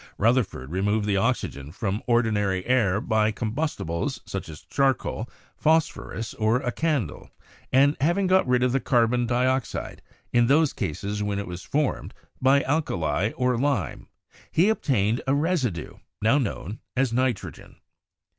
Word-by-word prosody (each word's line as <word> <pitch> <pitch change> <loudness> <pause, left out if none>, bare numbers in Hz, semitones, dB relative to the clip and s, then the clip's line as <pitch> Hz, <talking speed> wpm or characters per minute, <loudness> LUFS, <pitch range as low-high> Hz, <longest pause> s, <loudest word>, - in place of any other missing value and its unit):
Rutherford 110 - +1
removed 105 +4 0
the 100 -1 +1
oxygen 95 - -1
from 100 +3 -2
ordinary 105 -6 +1
air 110 -7 +2
by 110 0 +1
combustibles 110 - -2
such - - -5
as 75 - -10
charcoal, 135 -4 0 0.3
phos 160 0 +3
phorus, 115 0 -7
or 110 +2 +3
a 125 - -1
candle; 145 - -2 0.4
and 140 +3 +5
having 175 +7 +2
got 185 -5 +3
rid 125 0 +3
of 125 - +2
the 135 - +2
carbon 120 0 +2
dioxide, 130 +1 -1 0.3
in 120 -1 +4
those 150 +2 +3
cases 100 +7 -3
when 105 -1 -1
it 100 - -3
was 90 -1 -7
formed, 145 +5 -2 0.3
by 135 +2 +4
alkali 95 - 0
or 125 -2 +1
lime, 140 -6 -1 0.4
he 180 +6 +4
obtained 120 - +1
a 135 - +3
residue, 140 - -1 0.2
now 115 +7 +3
known 115 -4 -4 0.2
as 130 -2 +1
nitrogen. 125 -3 -2
120 Hz, 145 wpm, -25 LUFS, 105-135 Hz, 0.4 s, and